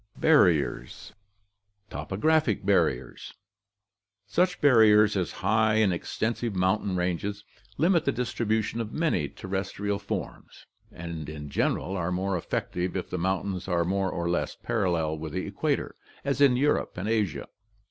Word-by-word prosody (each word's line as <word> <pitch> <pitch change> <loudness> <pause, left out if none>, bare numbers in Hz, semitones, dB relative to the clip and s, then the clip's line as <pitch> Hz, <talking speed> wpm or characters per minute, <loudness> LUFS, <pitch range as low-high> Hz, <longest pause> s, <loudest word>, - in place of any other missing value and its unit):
Barriers 85 - +2 0.4
* 100 0 -48
Topographic 110 -2 0
Barriers. 80 -11 0 0.5
— 100 +1 -62 0.2
Such 180 - +1
barriers 105 -6 +5
as 95 -3 -1
high 110 +1 +3
and 110 -4 +3
extensive 110 +5 -2
mountain 95 +1 +1
ranges 90 +3 -2 0.3
limit 170 +2 +3
the 140 - +2
distribution 115 -2 -1
of 110 -1 -5
many 125 - 0
terrestrial 100 +1 -3
forms, - - -6 0.3
and 85 -3 -7
in 75 -2 -8
general 95 - 0
are 90 -1 -2
more 95 +1 -1
effective 90 +1 -2
if 90 - -5
the 90 - -2
mountains 95 +1 -2
are 85 -2 +1
more 95 +1 0
or 85 0 -3
less 85 - -1
parallel 85 -7 -1
with 80 -1 -6
the 95 - -2
equator, 140 +9 -2 0.3
as 140 0 0
in 135 -3 +5
Europe 145 -6 0
and 95 +3 -3
Asia. 105 -7 -1
100 Hz, 140 wpm, -27 LUFS, 90-110 Hz, 0.5 s, barriers